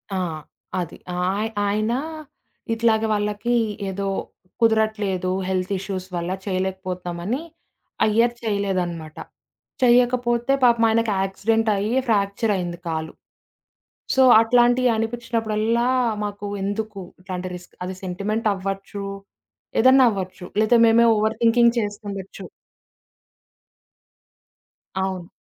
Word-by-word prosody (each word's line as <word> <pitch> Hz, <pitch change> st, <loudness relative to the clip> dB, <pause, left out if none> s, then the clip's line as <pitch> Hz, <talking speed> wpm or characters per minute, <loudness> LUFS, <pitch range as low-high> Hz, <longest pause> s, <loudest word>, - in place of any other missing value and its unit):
ఆ! -, -, 0 dB, 0.6 s
అది. 170 Hz, -2 st, -5 dB, 0.2 s
ఆయ 195 Hz, +5 st, 0 dB, 0.2 s
ఆయన 215 Hz, +3 st, 0 dB, 0.8 s
ఇట్లాగే 225 Hz, -1 st, +2 dB
వాళ్ళకి 210 Hz, +3 st, -1 dB, 0.4 s
ఏదో 195 Hz, +1 st, -3 dB, 0.5 s
కుదరట్లేదు 215 Hz, -4 st, +1 dB, 0.2 s
హెల్త్ 185 Hz, 0 st, -1 dB
ఇష్యూస్ 185 Hz, -1 st, -5 dB
వల్ల 175 Hz, +1 st, -2 dB
చేయలేకపోతునామని, 185 Hz, +2 st, -3 dB, 0.6 s
ఆ -, -, +5 dB
ఇయర్ 235 Hz, +1 st, +4 dB
చేయలేదనమాట. 185 Hz, -7 st, -2 dB, 0.7 s
చేయకపోతే 245 Hz, 0 st, +3 dB
పాపం 235 Hz, -2 st, +5 dB
ఆయనకి 225 Hz, -1 st, +2 dB
యాక్సిడెంట్ 220 Hz, +3 st, 0 dB
అయ్యి, 215 Hz, +6 st, -1 dB
ఫ్యాక్చరయ్యింది 200 Hz, -4 st, 0 dB
కాలు. 160 Hz, -1 st, -3 dB, 1.0 s
సో 265 Hz, -, +4 dB, 0.2 s
అట్లాంటియనిపించినప్పుడల్లా, 235 Hz, -1 st, +1 dB, 0.4 s
మాకు 205 Hz, 0 st, -5 dB, 0.2 s
ఎందుకు? 205 Hz, 0 st, -3 dB, 0.2 s
ఇట్లాంటి 185 Hz, 0 st, -5 dB
రిస్క్ 175 Hz, 0 st, -13 dB
అది 185 Hz, 0 st, -5 dB
సెంటిమెంటవ్వచ్చు, 195 Hz, +1 st, -2 dB, 0.8 s
ఏదైనా 260 Hz, +1 st, +7 dB
అవ్వచ్చు. 185 Hz, -2 st, -5 dB, 0.2 s
లేతే 230 Hz, +2 st, +4 dB
మేమే 235 Hz, +1 st, +5 dB
ఓవర్ 220 Hz, +1 st, 0 dB
థింకింగ్ 235 Hz, +1 st, +5 dB
చేసుకునుండొచ్చు. 205 Hz, -3 st, -6 dB, 2.5 s
అవును. 190 Hz, -2 st, -2 dB
205 Hz, 90 wpm, -23 LUFS, 190-230 Hz, 2.5 s, ఏదైనా